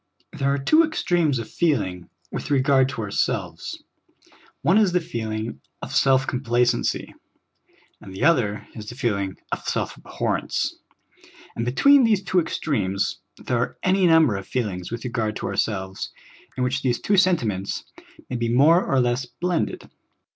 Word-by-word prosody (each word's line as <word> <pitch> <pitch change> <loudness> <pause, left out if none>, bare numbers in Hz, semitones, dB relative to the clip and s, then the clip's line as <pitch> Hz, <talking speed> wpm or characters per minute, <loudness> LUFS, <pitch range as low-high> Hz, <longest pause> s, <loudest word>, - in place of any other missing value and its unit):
THERE 140 0 0
are 140 - +1
two 310 - +4
extremes 175 - +1
of 115 -2 -5
feeling 100 - -1 0.2
with - - -5
regard 135 -1 +3
to 115 - -4
ourselves; 100 - -2 0.8
one 190 +6 +5
is 200 -5 +3
the 180 - +4
feeling 110 -9 -4 0.2
of - - -6
self 135 -1 +4
complacency, 125 -2 0 0.9
and 95 - -11
the 95 - -5
other 120 -11 +2
is 105 -1 -8
the 120 - -8
feeling 100 -7 -1
of - - -1
self - - -1
abhorrence; - - -2 0.8
and 115 +1 -2
be - - +1
tween 280 - +6
these 215 -4 +3
two 185 -1 +2
extremes 100 - -1 0.2
there 120 -2 -2
are 125 - -2
any 185 0 +3
number 160 -9 +5
of 95 - -8
feel 120 -4 -1
ings 90 0 -7
with 120 0 -5
regard 110 -3 -2
to - - -5
ourselves 95 -3 -2 0.5
in 130 - 0
which 130 +2 0
these 125 -2 0
two 205 - +1
senti 185 -8 +3
ments 100 -2 -3 0.4
may 125 - -3
be 115 0 -1
more 150 +9 +5
or 135 - +1
less 125 +1 0
blended. 175 +5 -2
125 Hz, 160 wpm, -23 LUFS, 110-165 Hz, 0.9 s, tween